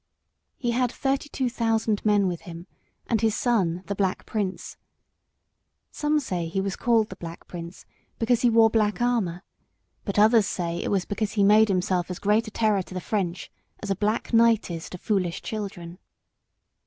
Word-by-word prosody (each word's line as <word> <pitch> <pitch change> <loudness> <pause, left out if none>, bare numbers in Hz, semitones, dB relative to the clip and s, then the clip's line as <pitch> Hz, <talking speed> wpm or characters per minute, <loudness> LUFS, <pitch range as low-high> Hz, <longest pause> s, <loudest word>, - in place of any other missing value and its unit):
He 240 -2 -1
had 245 0 +1
thirty 275 +2 -1
two 265 -3 -1
thousand 225 -3 0
men 205 -2 +3
with 175 -2 -3
him, 170 0 -9 0.4
and 225 -3 0
his 220 -1 +2
son, 185 -8 0
the 200 - -3
Black 190 -2 -1
Prince. 200 -4 -3 1.2
Some 300 0 +1
say 180 - -3
he 175 +4 -2
was 195 0 -2
called 230 -2 +2
the - - -8
Black 170 -1 -9
Prince 170 0 -9 0.3
because 235 +1 +1
he 245 - +4
wore 225 -1 +5
black 215 -1 +1
armour, 220 -8 0 0.6
but 200 - -4
others 215 0 +5
say 170 -3 -3
it - - -3
was 195 -2 0
because 210 0 -2
he 205 - +2
made 215 +2 +6
himself 185 -2 0
as 180 - -4
great 210 +3 +1
a - - -7
terror 215 -3 +1
to 185 - -10
the - - -1
French 180 -3 -3 0.3
as 200 - -2
a - - +1
black 215 +4 -1
night 230 -4 +4
is 165 -1 -6
to 180 - -7
foolish 180 -3 -1
children. 190 -5 -6
210 Hz, 180 wpm, -25 LUFS, 185-225 Hz, 1.2 s, made